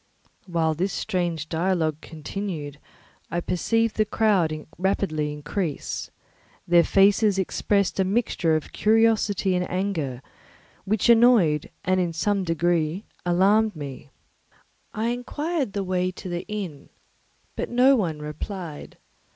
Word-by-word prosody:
While 165 Hz, -2 st, +1 dB
this 185 Hz, +5 st, -1 dB
strange 175 Hz, -6 st, -2 dB
dialogue 160 Hz, -2 st, 0 dB
continued, 155 Hz, -2 st, -6 dB, 0.5 s
I 170 Hz, -, -1 dB
perceived 225 Hz, +6 st, 0 dB
the 215 Hz, -, +4 dB
crowd 190 Hz, -8 st, +1 dB
rapidly 165 Hz, -6 st, 0 dB
increase. 150 Hz, +2 st, -4 dB, 0.6 s
Their 175 Hz, -1 st, +6 dB
faces 200 Hz, +2 st, +4 dB
expressed 195 Hz, +1 st, 0 dB
a -, -, +5 dB
mixture 190 Hz, -5 st, +1 dB
of 155 Hz, -, -3 dB
curiosity 215 Hz, -3 st, +2 dB
and 180 Hz, 0 st, -1 dB
anger, 165 Hz, -9 st, -2 dB, 0.6 s
which 210 Hz, +2 st, +1 dB
annoyed 225 Hz, -, +5 dB, 0.2 s
and 185 Hz, +1 st, +2 dB
in 175 Hz, -2 st, 0 dB
some 200 Hz, +4 st, 0 dB
degree 170 Hz, +2 st, 0 dB, 0.2 s
alarmed 200 Hz, +4 st, +3 dB
me. 140 Hz, -4 st, -8 dB, 0.8 s
I 220 Hz, +2 st, -1 dB
inquired 275 Hz, -, -2 dB
the 200 Hz, -, -1 dB
way 185 Hz, -1 st, 0 dB
to 185 Hz, 0 st, -8 dB
the 175 Hz, +1 st, -4 dB
inn, 190 Hz, -9 st, -6 dB, 0.7 s
but -, -, -3 dB
no 255 Hz, +3 st, +5 dB
one 175 Hz, -10 st, -1 dB
replied. 155 Hz, +1 st, -7 dB
185 Hz, 120 wpm, -24 LUFS, 160-210 Hz, 0.8 s, Their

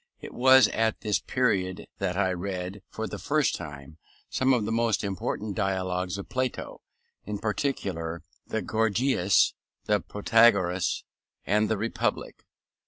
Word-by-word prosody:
It -, -, -9 dB
was 130 Hz, -1 st, +7 dB
at 110 Hz, -1 st, 0 dB
this 105 Hz, -2 st, +1 dB
period 95 Hz, -7 st, 0 dB
that 90 Hz, 0 st, -1 dB
I 95 Hz, -2 st, +2 dB
read, 90 Hz, +1 st, -4 dB
for 110 Hz, -, -4 dB
the -, -, -6 dB
first 145 Hz, -3 st, +1 dB
time, 75 Hz, -1 st, -8 dB, 0.3 s
some 130 Hz, +1 st, +2 dB
of 120 Hz, -5 st, +2 dB
the 110 Hz, -, -2 dB
most 115 Hz, -1 st, +1 dB
important 100 Hz, +1 st, -3 dB
dialogues 95 Hz, -2 st, -1 dB
of 100 Hz, -, -7 dB
Plato, 130 Hz, -1 st, -3 dB, 0.4 s
in 105 Hz, +1 st, -4 dB
particular 95 Hz, -, -2 dB, 0.2 s
the 110 Hz, -, -2 dB
Gorgias, 110 Hz, -2 st, +2 dB, 0.3 s
the -, -, +2 dB
Protagoras, 100 Hz, -4 st, +2 dB, 0.4 s
and 105 Hz, +2 st, +2 dB
the 110 Hz, -, +1 dB
Republic. 115 Hz, +3 st, -2 dB
105 Hz, 135 wpm, -27 LUFS, 95-115 Hz, 0.4 s, was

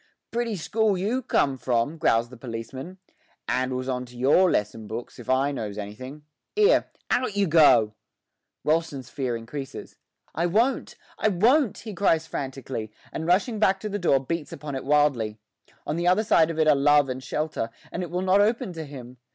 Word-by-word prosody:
'Pretty 235 Hz, -2 st, -1 dB
school 210 Hz, +3 st, +1 dB
you 220 Hz, +8 st, -1 dB
come 135 Hz, -, +1 dB
from!' 125 Hz, +6 st, 0 dB
growls 120 Hz, -7 st, +2 dB
the 125 Hz, -, -11 dB
policeman; 125 Hz, +8 st, -7 dB, 0.5 s
''andles 130 Hz, 0 st, -1 dB
on 125 Hz, -1 st, -2 dB
to 125 Hz, -1 st, -13 dB
your 145 Hz, +9 st, +4 dB
lesson 105 Hz, -2 st, -1 dB
books, 115 Hz, +3 st, -7 dB
if 120 Hz, -, -10 dB
I 135 Hz, +2 st, +2 dB
knows 105 Hz, -7 st, -5 dB
anything. 130 Hz, +8 st, -8 dB, 0.3 s
'Ere, 425 Hz, +3 st, +4 dB, 0.2 s
out 245 Hz, -5 st, 0 dB
you 200 Hz, -, +3 dB
go!' 130 Hz, -, +5 dB, 0.7 s
Rolleston's 150 Hz, -5 st, -1 dB
fear 130 Hz, -4 st, -2 dB
increases. 135 Hz, +4 st, -8 dB, 0.4 s
'I 170 Hz, -, 0 dB
won't! 230 Hz, +9 st, +1 dB, 0.2 s
I -, -, +2 dB
won't!' 225 Hz, -, +3 dB
he 215 Hz, -, -5 dB
cries 165 Hz, -5 st, +2 dB
frantically, 130 Hz, -7 st, -5 dB, 0.2 s
and 160 Hz, -, -4 dB
rushing 205 Hz, +5 st, +2 dB
back 195 Hz, -2 st, +3 dB
to 215 Hz, -, -4 dB
the 205 Hz, 0 st, -3 dB
door 150 Hz, -7 st, +3 dB
beats 155 Hz, +3 st, -4 dB
upon 150 Hz, -1 st, -7 dB
it 135 Hz, -, -4 dB
wildly. 140 Hz, -7 st, +2 dB, 0.5 s
On 150 Hz, -, -2 dB
the 175 Hz, +1 st, 0 dB
other 185 Hz, +4 st, +4 dB
side 165 Hz, -6 st, +4 dB
of 165 Hz, -, -4 dB
it 155 Hz, -1 st, +3 dB
are 155 Hz, -, +7 dB
love 145 Hz, 0 st, +4 dB
and 130 Hz, 0 st, -5 dB
shelter, 150 Hz, -3 st, -2 dB, 0.2 s
and 175 Hz, -, -3 dB
it 175 Hz, -, -4 dB
will 180 Hz, +1 st, -2 dB
not 190 Hz, +2 st, +4 dB
open 220 Hz, -1 st, +1 dB
to 160 Hz, -1 st, -6 dB
him. 130 Hz, -3 st, -10 dB
150 Hz, 185 wpm, -25 LUFS, 130-185 Hz, 0.7 s, are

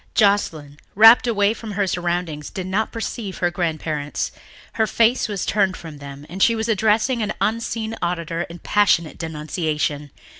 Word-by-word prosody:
Joscelyn, 160 Hz, -8 st, +1 dB, 0.2 s
rapt 225 Hz, +4 st, +8 dB
away 205 Hz, -2 st, +2 dB
from 225 Hz, -2 st, -8 dB
her 200 Hz, 0 st, +1 dB
surroundings, 175 Hz, -4 st, -2 dB
did 190 Hz, -2 st, -5 dB
not 195 Hz, +4 st, -1 dB
perceive 225 Hz, -3 st, -5 dB
her 175 Hz, -1 st, 0 dB
grandparents. 155 Hz, -4 st, -2 dB, 0.4 s
Her 220 Hz, -1 st, +1 dB
face 235 Hz, +3 st, +2 dB
was 205 Hz, -4 st, -3 dB
turned 195 Hz, -3 st, +1 dB
from 155 Hz, -3 st, -10 dB
them 140 Hz, 0 st, -10 dB
and 185 Hz, +4 st, -7 dB
she 230 Hz, -, +5 dB
was 220 Hz, 0 st, -2 dB
addressing 220 Hz, +3 st, +2 dB
an 215 Hz, 0 st, -1 dB
unseen 225 Hz, 0 st, -1 dB
auditor 170 Hz, -1 st, -2 dB
in 170 Hz, -, -9 dB
passionate 170 Hz, -4 st, +1 dB
denunciation. 150 Hz, -2 st, -2 dB
185 Hz, 155 wpm, -21 LUFS, 160-220 Hz, 0.4 s, rapt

